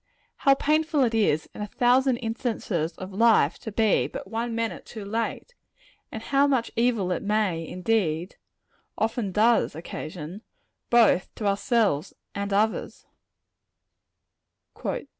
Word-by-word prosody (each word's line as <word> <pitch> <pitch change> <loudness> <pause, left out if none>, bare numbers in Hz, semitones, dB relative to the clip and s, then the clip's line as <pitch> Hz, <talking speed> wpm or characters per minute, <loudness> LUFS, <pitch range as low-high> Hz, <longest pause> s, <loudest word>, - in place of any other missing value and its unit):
How 275 -1 +4
painful 305 0 +2
it 235 -2 +1
is, 200 -9 +1
in - - -8
a 210 - -3
thousand 250 +2 +3
instances 225 -8 -2
of 185 +1 -8
life, 215 -7 +4
to 220 - -7
be 220 0 +2
but - - -8
one 230 +1 -2
minute 230 -1 -3
too 215 -3 -9
late; 230 - -3 0.6
and 220 - -6
how 280 +2 +3
much 260 -5 0
evil 230 -6 +1
it - - -1
may, 200 -6 0
indeed, 180 -3 -1 0.6
often 225 -2 -1
does 220 -3 +3
occasion, 165 +3 -7 0.5
both 230 -6 +4
to 215 - -5
ourselves 200 - +1 0.2
and 200 0 -3
others! 215 +2 0
220 Hz, 125 wpm, -26 LUFS, 190-235 Hz, 0.6 s, How